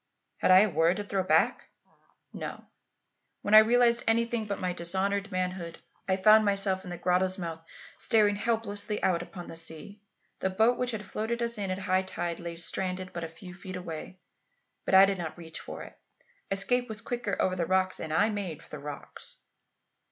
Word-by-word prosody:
Had - - +1
I 185 +1 +8
a 215 - +3
word 165 +3 +2
to 205 - -3
throw 200 -1 -1
back? 185 - +1 0.6
No. - - -7 0.8
When 205 - -1
I 215 - +12
realized 235 +1 +4
anything 230 -1 +1
but 200 -1 -3
my 180 -1 -2
dishonoured 195 +4 0
manhood, 180 -2 -3 0.3
I 190 -1 +1
found 215 +3 +6
myself 195 -2 +1
in 180 - -9
the 175 - -5
grotto's 185 +2 +1
mouth 165 -3 -5 0.4
staring 210 -3 +4
helplessly 210 -1 -1
out 175 -2 +2
upon 175 0 -9
the 165 - -8
sea. 165 +5 -3 0.4
The 190 - 0
boat 220 +6 +2
which 250 - 0
had 215 -4 -4
floated 230 +4 -3
us 235 -2 +1
in 195 -2 -2
at 185 - -2
high 185 -1 +1
tide 175 -2 -4
lay 170 -1 -6
stranded 185 +2 -2
but 170 - -5
a - - -3
few 180 +3 -12
feet 185 0 -9
away, 180 0 -7 0.7
but - - +2
I 190 +1 +9
did 195 -1 -2
not 165 -1 -5
reach 160 -2 -7
for - - -8
it. - - -13 0.5
Escape 245 +6 +1
was 220 -1 -4
quicker 240 -4 -3
over 185 - +1
the 170 -2 -2
rocks, 185 0 +1
and 160 - -5
I 205 +8 +3
made 190 -7 -4
for - - -13
the 150 - -7
rocks. 145 0 -9
190 Hz, 195 wpm, -28 LUFS, 175-210 Hz, 0.8 s, I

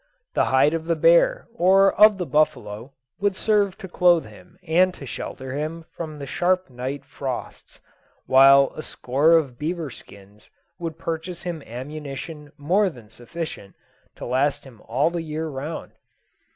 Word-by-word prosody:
The - - +2
hide 135 +4 +3
of 165 -1 -3
the 165 0 +1
bear - - +4
or 195 -1 +4
of 210 -1 +6
the 180 - -3
buffalo 120 -6 -1 0.3
would 200 -1 +1
serve 205 -3 +1
to 195 - -8
clothe 175 -2 +3
him 180 0 -16
and 180 +2 +3
to 140 - -10
shelter 130 +1 -6
him 160 +3 -4
from 155 -3 -7
the 140 - -6
sharp 180 +2 0
night 130 +3 -5
frosts; 130 -3 -7 0.5
while 135 +1 +6
a - - -5
score 145 +3 +1
of 140 -7 +2
beaver 160 -1 -3
skins 100 -1 -15 0.3
would 165 -2 -5
purchase 165 +2 -5
him 170 -3 -4
ammunition 145 +4 -7
more 185 +8 +2
than 120 -10 -14
sufficient 120 - -8 0.4
to - - -8
last 135 +4 0
him 120 -5 -15
all 135 +8 +1
the 170 -1 -3
year 160 0 -4
round. 150 +2 -6
155 Hz, 155 wpm, -23 LUFS, 135-175 Hz, 0.5 s, of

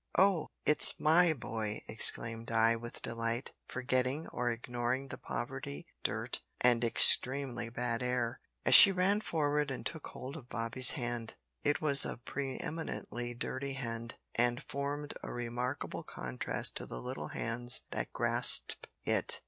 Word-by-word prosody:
"Oh! 190 -3 +2 0.2
it's 150 - +5
my 165 +2 +4
boy," 110 -6 -6
exclaimed 115 +1 +1
Di 115 0 +2
with 120 +1 -8
delight, 115 +2 -3 0.2
forgetting 130 +3 -2
or 120 0 -3
ignoring 120 +3 -4
the - - -9
poverty, 65 +4 -7 0.2
dirt, - - -2 0.2
and 120 -1 +2
extremely 120 +1 +4
bad 120 0 -4
air, 125 0 -3 0.3
as - - +4
she 200 - +12
ran 195 +3 0
forward 150 -5 -2
and 130 - -7
took 160 -3 -3
hold 130 +2 -9
of 125 -5 -14
Bobby's 115 +2 +3
hand. 120 -3 -5 0.3
It 145 0 -1
was 145 -2 +8
a - - -5
pre 135 +2 -6
eminently 120 -6 -6
dirty 135 +3 -5
hand, 115 -3 -6 0.2
and 120 +1 0
formed 145 +1 -5
a - - -8
remarkable 120 +3 -5
contrast 65 -1 -4
to - - -2
the - - -7
little - - -7
hands 120 +1 0
that - - -5
grasped - - +2 0.2
it! - - -2
125 Hz, 145 wpm, -31 LUFS, 115-140 Hz, 0.3 s, she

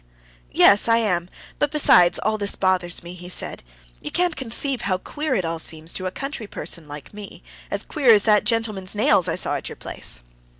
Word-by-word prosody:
Yes, 205 - +5
I 230 0 +4
am; 180 -6 -1 0.3
but 295 - +1
besides, 180 - +4
all 215 +1 -1
this 200 -1 +2
bothers 180 -2 0
me," 175 +1 -9
he 180 0 -10
said. - - 0 0.4
"You - - -6
can't 355 -2 0
conceive 265 0 +1
how 185 -2 -1
queer 295 +7 -4
it 185 -5 -1
all 165 0 -3
seems 160 0 +1
to 185 - -4
a - - -4
country 275 -2 -6
person 165 -5 -5
like 145 +4 -10
me, 205 -1 -11 0.3
as - - -3
queer 275 -7 +2
as 210 -2 +5
that 210 -2 +3
gentleman's 215 -5 -1
nails 195 -4 +3
I 165 - -1
saw - - +1
at - - -7
your - - -9
place...." - - -5
200 Hz, 205 wpm, -22 LUFS, 175-230 Hz, 0.4 s, Yes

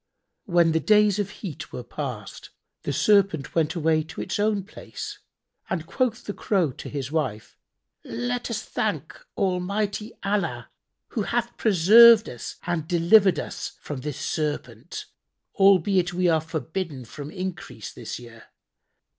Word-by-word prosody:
When 175 -5 +4
the 160 - +2
days 210 +3 +4
of 205 -1 -1
heat 195 -6 -8
were 125 - -6
past, 120 -5 -6 0.3
the - - -3
Serpent 165 0 +2
went 160 -1 +1
away 160 -1 +2
to 160 - -10
its 190 - -3
own 205 -1 +1
place 200 - -8 0.5
and 170 -4 -2
quoth 245 +3 -1
the 205 - -5
Crow 185 -10 +1
to - - -9
his 140 -1 -4
wife, 130 -10 -2 0.5
"Let 120 +2 -3
us 220 -2 -3
thank - - -2 0.2
Almighty 200 +3 -1
Allah, 170 - -1 0.4
who 225 - -2
hath 235 +3 -1
preserved 220 +3 +7
us 120 - -7
and 170 -3 -2
delivered 180 +3 +5
us - - -5
from 140 -3 -6
this 150 0 -4
Serpent, 145 -3 -3 0.5
albeit 190 -2 +4
we 180 0 +2
are 160 -2 +3
forbidden 160 -3 -4
from 145 +5 -8
increase 170 - -6
this 115 - -6
year. 115 -2 -13
170 Hz, 140 wpm, -25 LUFS, 145-200 Hz, 0.5 s, preserved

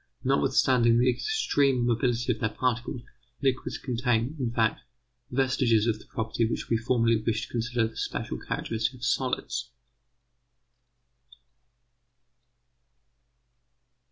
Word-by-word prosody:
Notwithstanding 120 -3 +3
the 125 +1 +4
extreme 140 - +1
mobility 120 +1 +1
of 110 - -11
their 110 - 0
particles, 120 0 -2 0.4
liquids 130 -1 0
contain, 125 +1 0
in 125 -3 0
fact, 115 -2 +1 0.5
vestiges 125 -4 +2
of 110 -2 0
the - - -16
property 110 +1 -2
which 115 - -2
we 115 - +4
formerly 115 0 +2
wished 110 0 -1
to - - -9
consider 120 -1 0
the 110 - -13
special - - -3
characteristic 115 +3 -2
of 120 -1 -6
solids. 130 +2 -1
120 Hz, 110 wpm, -27 LUFS, 115-125 Hz, 0.5 s, the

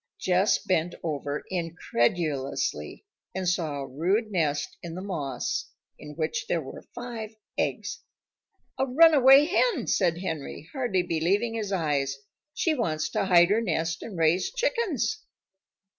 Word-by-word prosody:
Jess 185 +3 +3
bent 175 -2 0
over 145 -2 -3
incredulously 165 - -1 0.3
and 190 -1 -2
saw 170 -5 0
a 135 - -5
rude 190 - 0
nest 150 -6 0
in 170 -1 -7
the 185 - -5
moss 160 -9 -3 0.3
in 150 0 -10
which 155 0 -2
there 170 - +1
were 135 - -9
five 230 -3 -6 0.2
eggs. - - -2 0.8
"A 265 - +3
runaway 275 -1 +7
hen!" 360 - +1
said 175 -4 +2
Henry, 160 -4 -5
hardly 240 -10 0
believing 185 +8 0
his 215 -3 -3
eyes. 145 -7 0 0.4
"She 325 - +1
wants 155 - -1
to - - 0
hide 175 -1 +5
her 220 +2 +3
nest 165 -4 -1
and 205 -6 -7
raise 165 +3 +2
chickens." 470 - 0
180 Hz, 135 wpm, -27 LUFS, 155-230 Hz, 0.8 s, runaway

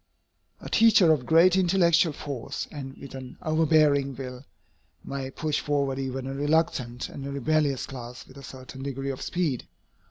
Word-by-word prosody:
A - - -9
teacher 215 -7 +5
of 130 -5 -3
great 170 +3 +6
intellectual 175 -3 +4
force, 140 -4 -5
and 135 -2 -8
with 140 - -10
an 130 -1 -9
overbearing 155 -3 +3
will, 125 -1 -7 0.6
may 135 -1 -5
push 155 +2 -2
forward 140 -2 -1
even 130 -1 -3
a 135 - -4
reluctant 140 -4 0
and 140 - -8
a 140 - -5
rebellious 140 0 0
class 120 -2 -9
with 130 - -15
a - - -12
certain 130 0 -10
degree 135 0 -3
of 130 - -7
speed. 160 -9 -2
140 Hz, 160 wpm, -26 LUFS, 130-155 Hz, 0.6 s, great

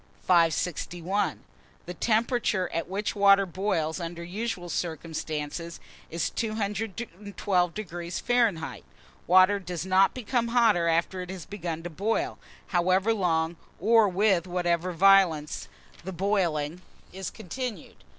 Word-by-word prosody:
561. 175 +2 +1 0.4
THE 180 - -6
TEMPERATURE 220 -2 0
AT 165 0 -2
WHICH 200 +3 -2
WATER 200 -1 +6
BOILS, 175 -3 -1
under 170 0 -5
usual 185 0 -4
circumstances, 165 -1 -4 0.3
is 165 +1 -2
212° 200 -4 -2
Fahr. 230 -10 +1 0.5
Water 185 +3 +6
does 180 -2 -5
not 190 +1 +4
become 240 -1 -1
hotter 230 -8 +3
after 170 +3 +1
it 180 - -7
has 185 -3 -7
begun 170 -5 -5
to 175 - -6
boil, 225 - -1 0.3
however 185 +4 +2
long 170 -4 0 0.2
or 220 +2 +5
with 190 -2 +2
whatever 175 0 0
violence 175 -4 +3 0.4
the 190 - -5
boiling 175 -4 0 0.3
is 190 0 -5
continued. 220 -1 -7
185 Hz, 110 wpm, -27 LUFS, 170-205 Hz, 0.5 s, WATER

